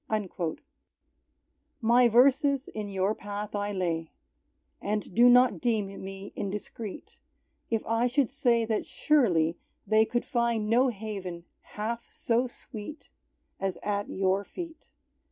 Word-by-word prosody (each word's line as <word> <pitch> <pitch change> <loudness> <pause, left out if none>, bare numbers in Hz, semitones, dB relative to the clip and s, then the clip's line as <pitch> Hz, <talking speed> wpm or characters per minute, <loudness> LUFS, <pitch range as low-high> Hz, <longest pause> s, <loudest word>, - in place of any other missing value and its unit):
_" 185 -6 -2 1.2
My 240 +1 +5
verses 270 +3 +4
in 210 -1 -5
Your 195 +1 +1
path 205 0 -6
I 205 0 -1
lay, 170 -4 -2 0.7
And 210 -2 -2
do 240 +4 +7
not 250 +1 +5
deem 210 -6 -1
me 195 +1 -8
indiscreet, 205 +1 -6 0.5
If 225 -2 -1
I 230 +2 +2
should 260 0 +1
say 240 -4 +2
that 220 -1 0
surely 175 - +2 0.3
they 220 0 +4
Could 240 +1 -1
find 235 -4 0
no 245 +4 +4
haven 195 -6 -5 0.3
half 230 +3 -3
so 240 +2 0
sweet 245 +4 -9 0.5
As 195 -1 -2
at 205 0 -1
Your 190 +1 +1
feet. 330 - -8
215 Hz, 125 wpm, -28 LUFS, 195-240 Hz, 1.2 s, do